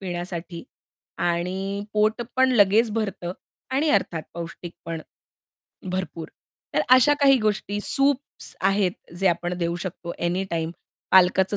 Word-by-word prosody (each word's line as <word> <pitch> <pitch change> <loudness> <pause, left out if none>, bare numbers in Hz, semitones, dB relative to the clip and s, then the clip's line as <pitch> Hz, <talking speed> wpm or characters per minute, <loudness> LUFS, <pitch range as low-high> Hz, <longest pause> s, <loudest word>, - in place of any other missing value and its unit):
पिण्यासाठी 175 -2 -5 0.6
आणि 190 +4 -1
पोट 215 +2 +2
पण 260 0 +4
लगेच 215 +1 +4
भरतं 200 -5 -3 0.4
आणि 295 +4 +2
अर्थात 165 - +1
पौष्टिक 170 0 -7
पण 165 -1 -4 0.9
भरपूर. 180 -3 -4 0.5
तर 155 - +3
अशा 255 +3 +5
काही 275 -1 +6
गोष्टी. 205 -1 -1
सूप्स 275 +2 +1
आहेत, 195 -1 +2 0.2
जे 190 +2 0
आपण 175 +1 -1
देऊ 170 0 -1
शकतो 170 -1 -6
एनीटाईम. 170 -2 -1 0.4
पालकाचं 190 +2 +5
190 Hz, 120 wpm, -24 LUFS, 175-215 Hz, 0.9 s, काही